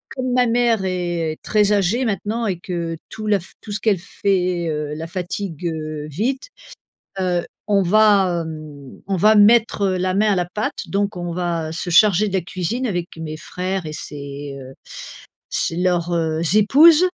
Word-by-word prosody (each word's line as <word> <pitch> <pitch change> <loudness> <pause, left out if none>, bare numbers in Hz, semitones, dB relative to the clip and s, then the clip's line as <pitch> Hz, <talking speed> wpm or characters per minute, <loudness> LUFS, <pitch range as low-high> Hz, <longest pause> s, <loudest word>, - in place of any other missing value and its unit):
comme 255 -1 -2
ma 250 0 +3
mère 230 -3 +2
est 175 -3 -2
très 210 -1 +2
âgée 205 +5 +2
maintenant 220 +1 -2
et 190 -3 -1
que 170 -2 -4
tout 215 -1 -6
la 205 -2 +3
fa 175 - -13
tout 215 - -9
ce 205 - -2
qu'elle 210 -5 +2
fait, 180 -2 -1
heu, 150 -1 -3
la 160 +1 -5
fatigue, 180 -1 -4
heu, 155 -2 -4
vite, 230 - -2 0.7
heu, 180 -2 0 0.2
on 200 -2 +3
va, 190 -3 +4
hem, 150 -4 -10
on 195 - 0
va 215 +5 +5
mettre, 215 0 +5
heu, 190 -2 +2
la 185 0 0
main 210 +2 +3
à - - +1
la 180 - +1
pâte. 210 +5 -4
Donc 200 0 -1
on 175 -1 -4
va 170 -2 -2
se 175 +2 -4
charger 205 +3 +5
de 195 - -6
la 190 - +2
cuisine 185 +8 -3
avec 175 -5 -2
mes 155 -1 -6
frères 185 +3 -4
et 155 - -5
ses, 140 -1 -7
heu, 130 0 -11 0.8
ses - - 0
leurs, 175 -1 0
heu, 160 -1 0
épouses 300 - +6
185 Hz, 180 wpm, -20 LUFS, 165-210 Hz, 0.8 s, épouses